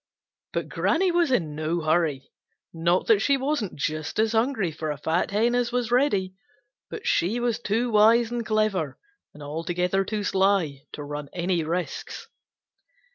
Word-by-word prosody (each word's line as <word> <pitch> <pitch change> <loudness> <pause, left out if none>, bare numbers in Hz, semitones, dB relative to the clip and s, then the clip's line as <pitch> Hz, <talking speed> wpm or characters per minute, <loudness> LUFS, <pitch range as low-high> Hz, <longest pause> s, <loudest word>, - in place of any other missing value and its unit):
But - - -2
Granny 360 +3 +1
was 345 -2 +2
in 170 - 0
no 155 +3 -2
hurry. 155 -4 0 0.4
Not 170 +2 +1
that 225 -3 +4
she 280 +4 +3
wasn't 265 -7 -2
just 155 +1 -3
as 220 0 +2
hungry 225 -5 +1
for 155 0 -5
a 150 - -3
fat 160 +4 0
hen 225 +4 +2
as 245 -1 +1
was 245 -1 -1
Reddy, 225 -8 +2 0.6
but 450 +1 -7
she 230 - +1
was 240 -2 0
too 235 +2 -1
wise 225 +2 +5
and 240 -1 -2
clever 215 -9 0 0.4
and 150 - -10
altogether 175 +5 -1
too 210 +1 -3
sly 190 -8 +1
to 145 - -6
run 145 0 -6
any 175 -1 0
risks. 170 +3 -4
195 Hz, 160 wpm, -25 LUFS, 160-235 Hz, 0.6 s, wise